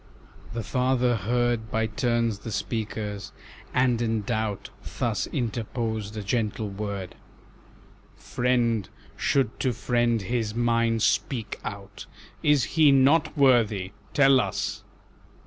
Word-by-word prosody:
The 115 - -2
father 125 +1 +1
heard 120 +2 0
By 110 +1 0
turns 115 -1 0
the 115 - -7
speakers, 105 -3 -4 0.4
and 125 -2 +2
in 110 -2 0
doubt 110 -2 -2 0.3
Thus - - 0
interposed 110 -2 -3
a 105 - -4
gentle 110 -1 -1
word, 100 -2 -5 1.0
"Friend 120 -5 0 0.3
should 130 -4 0
to 130 -2 +1
friend 120 -1 +1
his 110 0 -2
mind 115 -1 +1
speak 115 -5 0
out, 100 0 -8 0.3
Is 150 -3 +4
he 155 -3 +4
not 140 +4 +4
worthy? 110 -9 +3 0.2
tell 135 -2 +5
us." - - -3
115 Hz, 115 wpm, -26 LUFS, 105-125 Hz, 1.0 s, tell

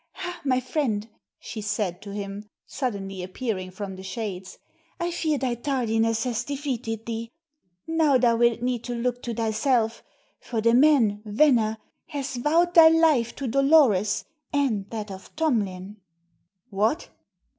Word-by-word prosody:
"Hah, 360 -2 -6
my 255 -3 +2
friend," 245 -5 -1 0.3
she 220 - -7
said 205 -4 -2
to 205 - -9
him, 200 +1 -6 0.2
suddenly 200 -8 -4
appearing 185 0 -4
from 190 +1 -6
the 185 - -9
shades. 190 -1 -6 0.4
"I 345 0 -1
fear 315 -3 0
thy 260 -2 -1
tardiness 225 -3 0
has 245 -3 -1
defeated 255 -6 -4
thee. 230 0 -4 0.6
Now 320 -4 +3
thou'lt 235 -1 +3
need 245 -2 -1
to 245 - -3
look 245 +1 -2
to 240 - -4
thyself, 225 +1 +1 0.4
for 230 - -4
the 230 +1 +3
man 245 -6 +4
Venner 220 -1 +3 0.3
has 275 -4 -4
vowed 330 +7 +2
thy 330 -2 +9
life 315 -8 +3
to 275 - -4
Dolores, 265 -6 +3 0.3
and 240 -9 0
that 215 -3 -5
of 190 0 -11
Tomlin." 210 - -1 0.7
"What! 215 - 0
235 Hz, 140 wpm, -25 LUFS, 210-275 Hz, 0.7 s, thy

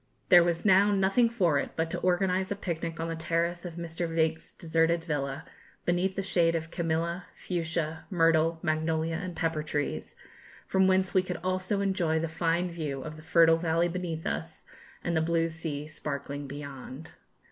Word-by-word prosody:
There 175 -1 +9
was 170 +1 -1
now 200 +1 +6
nothing 200 +4 +3
for 180 -11 +2
it - - -4
but 165 0 -1
to - - -1
organise 185 +1 +1
a 205 - -1
picnic 165 -4 -4
on 165 - -2
the 165 - -3
terrace 170 +2 -1
of 170 -2 -6
Mr. 170 0 -4
Veitch's 160 0 0
deserted 165 0 +1
villa, 145 -2 -2 0.4
beneath 180 +2 +1
the 195 - -2
shade 170 -3 +2
of 160 0 -3
camellia, 170 +1 -1
fuchsia, 165 -2 -3
myrtle, 165 -2 +3
magnolia, 160 0 0
and 180 -1 -5
pepper 165 -2 0
trees, 145 - -3 0.5
from 190 0 +3
whence 190 -1 +2
we 185 - +5
could 180 -1 -4
also 185 +2 0
enjoy 185 -5 +1
the 165 +1 0
fine 170 +2 0
view 150 -5 -4
of 155 0 -7
the 155 - -11
fertile 165 0 +5
valley 165 +1 +1
beneath 170 -2 -4
us 80 +3 -4 0.4
and 170 - -1
the 160 - +3
blue 165 0 +1
sea 160 -3 -5
sparkling 145 -2 -5
beyond. 140 +1 -8
165 Hz, 175 wpm, -29 LUFS, 160-180 Hz, 0.5 s, There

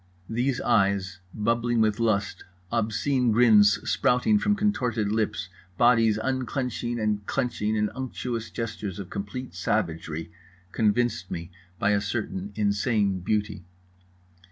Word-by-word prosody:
These 125 +3 0
eyes 100 -2 +1
bubbling 115 +3 0
with 110 0 +2
lust, 110 -3 0 0.3
obscene 115 +3 +1
grins 105 -3 +5
sprouting 135 - +3
from 205 0 +2
contorted 125 - 0
lips, 105 -4 -1 0.3
bodies 115 -3 +4
unclenching 125 -1 -2
and 105 -1 0
clenching 120 -5 -1
in 105 -1 0
unctuous 125 -3 -4
gestures 105 -4 -5
of 100 -2 -8
complete 105 +5 -5
savagery, 85 -4 -2 0.4
convinced 110 -3 +1
me 85 +1 -6 0.3
by 100 - +2
a 100 -1 +2
certain 100 -2 -3
insane 100 -1 +1
beauty. 105 0 -2
110 Hz, 115 wpm, -26 LUFS, 100-120 Hz, 0.4 s, grins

